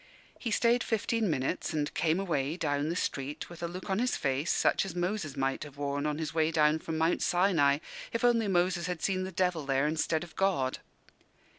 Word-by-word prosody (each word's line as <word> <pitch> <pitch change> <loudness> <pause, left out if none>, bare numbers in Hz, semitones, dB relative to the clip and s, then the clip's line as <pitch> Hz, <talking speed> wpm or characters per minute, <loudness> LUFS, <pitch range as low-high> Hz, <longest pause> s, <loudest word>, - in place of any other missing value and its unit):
He 240 - -3
stayed 235 +2 +3
fifteen 225 -1 0
minutes 155 +4 -1
and 145 -1 -1
came 160 +3 +1
away, 155 -5 -1
down 145 -2 0
the 170 - -1
street, 145 -1 -3
with 170 - -10
a 170 - -1
look 180 +2 -7
on 190 0 0
his 250 +1 +1
face 140 +4 -1
such - - +2
as 190 -3 -6
Moses 175 -4 -2
might 135 0 0
have 145 -2 -11
worn 145 +1 -1
on 150 0 -1
his 155 -2 -3
way 160 -1 +2
down 155 -1 +3
from 160 0 -4
Mount 160 +2 +2
Sinai, 175 -6 +3 0.3
if 230 - -2
only 235 -3 +4
Moses 175 -2 +1
had 180 -3 -4
seen 185 -1 0
the 190 - -5
devil 180 -3 0
there, 135 0 +1
instead 160 +1 0
of 170 -2 -12
God. 175 -10 +1
165 Hz, 205 wpm, -30 LUFS, 145-185 Hz, 0.3 s, only